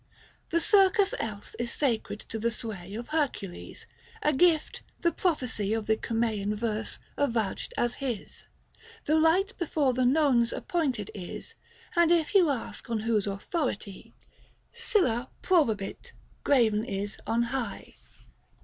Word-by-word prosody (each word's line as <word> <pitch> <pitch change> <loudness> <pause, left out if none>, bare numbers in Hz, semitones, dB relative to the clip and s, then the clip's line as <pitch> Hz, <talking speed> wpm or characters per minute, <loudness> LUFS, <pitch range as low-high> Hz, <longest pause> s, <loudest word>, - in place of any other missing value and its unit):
The 335 - +2
circus 390 +2 +4
else 205 -2 -5
is 235 0 -1
sacred 230 -6 0
to 225 - -6
the 230 +2 +1
sway 210 -4 -6
Of 235 +2 -6
Hercules 285 - -3 0.2
— 465 -2 -17
a 300 - +3
gift, 320 +1 +3 0.2
the 340 - +3
prophecy 255 - 0
Of 220 -2 -2
the 220 - +3
Cumsean 220 -3 -1
verse 220 0 -2 0.2
avouched 230 -8 0
as 240 0 +1
his. 250 -6 -4 0.6
The 305 - +2
light 340 +5 +3
before 295 -6 +1
the 255 +1 +1
nones 250 -3 +4
appointed 270 - -1
is; 180 -4 -7 0.4
And 340 -1 +5
if 330 -3 +2
you 365 -6 +6
ask 255 -3 -4
on 225 -2 -1
whose 220 -2 +1
authority, 200 - -3 0.6
Sylla 245 - +1
pkobavit 225 - +1 0.3
graven 225 -6 +3
is 200 -2 -4
on 235 +1 +2
high. 235 -7 -4
240 Hz, 135 wpm, -28 LUFS, 215-315 Hz, 0.6 s, you